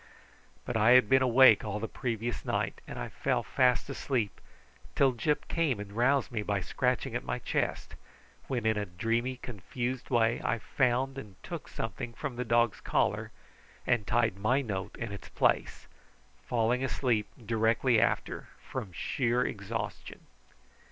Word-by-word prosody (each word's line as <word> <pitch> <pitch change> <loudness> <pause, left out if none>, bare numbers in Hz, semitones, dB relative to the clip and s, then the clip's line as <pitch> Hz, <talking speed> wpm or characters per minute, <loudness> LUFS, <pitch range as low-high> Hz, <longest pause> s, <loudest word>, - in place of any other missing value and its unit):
But 120 - -3
I 110 +2 +6
had 125 -4 +6
been 130 0 +5
awake 130 +1 +7
all 105 -1 -3
the 115 - -3
previous 120 -1 -3
night, - - -2
and - - -7
I - - -3
fell - - -1
fast 125 -1 +2
asleep, 130 -6 -2 0.5
till 135 -2 +4
Gyp 150 +5 -1
came 150 -10 0
and 105 -1 -7
roused 130 +4 +2
me 110 -3 -1
by 105 -1 -1
scratching 125 +6 -1
at - - -2
my - - -2
chest, - - -2 0.5
when 120 -4 -2
in 110 -1 +2
a 105 - -3
dreamy 115 +8 -1
confused 120 +3 -5
way 115 -2 +2
I 120 - +1
found 130 +2 0
and 105 -7 -11
took - - -6
something 120 - -5
from 140 0 -4
the 125 - -2
dog's 115 -2 +2
collar - - 0 0.6
and 120 -5 +1
tied 115 -4 +2
my 125 +7 +2
note 100 -5 -4
in 115 -3 -4
its 100 - -8
place, - - +1 0.6
falling 120 +2 +1
asleep 120 -5 0 0.2
directly 115 +2 +3
after - - -1 0.2
from 95 - -5
sheer 125 +5 0
exhaustion. 105 +2 -5
120 Hz, 155 wpm, -30 LUFS, 110-130 Hz, 0.6 s, awake